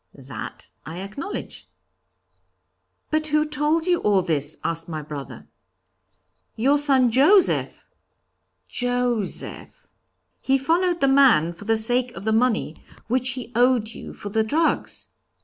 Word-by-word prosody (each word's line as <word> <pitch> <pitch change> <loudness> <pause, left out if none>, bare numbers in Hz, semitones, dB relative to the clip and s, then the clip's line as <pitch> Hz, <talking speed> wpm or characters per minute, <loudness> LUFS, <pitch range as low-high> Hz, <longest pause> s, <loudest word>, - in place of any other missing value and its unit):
'That - - -9 0.2
I 160 +4 -8
acknowledge.' 210 - -7 1.4
'But 310 0 0
who 305 0 +2
told 300 +2 0
you 355 -1 +2
all 200 -3 +2
this?' 150 -2 -2
asked 165 0 -3
my 155 -2 -5
brother. 145 -2 -8 1.1
'Your 275 +6 +2
son, 265 -4 +3
Joseph!' 310 - +3 0.8
'Joseph!' 245 -4 -3 0.5
'He 270 0 +2
followed 345 +5 0
the 275 - +4
man 265 - +4
for 170 +4 -13
the 225 +1 +2
sake 245 +3 +3
of 195 - -9
the 220 +1 0
money, 230 0 0 0.3
which 255 +1 +1
he 250 -2 -8
owed 245 -2 +2
you - - -9
for 205 - -8
the 220 +2 +1
drugs.' 315 +9 -1
245 Hz, 130 wpm, -23 LUFS, 205-290 Hz, 1.4 s, the